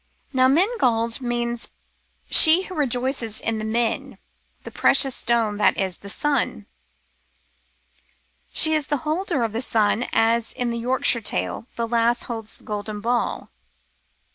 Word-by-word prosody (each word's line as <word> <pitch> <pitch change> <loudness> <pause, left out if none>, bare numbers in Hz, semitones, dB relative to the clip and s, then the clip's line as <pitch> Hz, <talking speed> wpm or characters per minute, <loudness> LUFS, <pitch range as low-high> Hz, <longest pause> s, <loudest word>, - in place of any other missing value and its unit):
Now 255 -1 +4
Menglod 260 - +1
means 240 -1 -3 0.6
she 325 +4 +8
who 375 - -9
rejoices 255 - -1
in 225 -1 -2
the - - -5
Metiy 225 +1 -2 0.5
the - - -9
Precious 270 -3 +2
Stone,^ 225 -3 -1
that - - +2
is, 190 -3 -2
the 200 - -10
sun. 270 - -2 1.9
She 315 0 +5
is 305 -3 0
the 290 - 0
holder 315 -3 -1
of 225 -2 -3
the 230 - -2
sun, 225 -1 0
as 230 0 +1
in 245 -2 -2
the 235 - -4
Yorkshire 245 -1 +2
story 215 - -3
the 230 0 -3
lass 235 +1 +1
holds 225 -2 -7
the - - -18
golden 210 0 -5
ball. 235 +3 -2
235 Hz, 140 wpm, -22 LUFS, 225-265 Hz, 1.9 s, she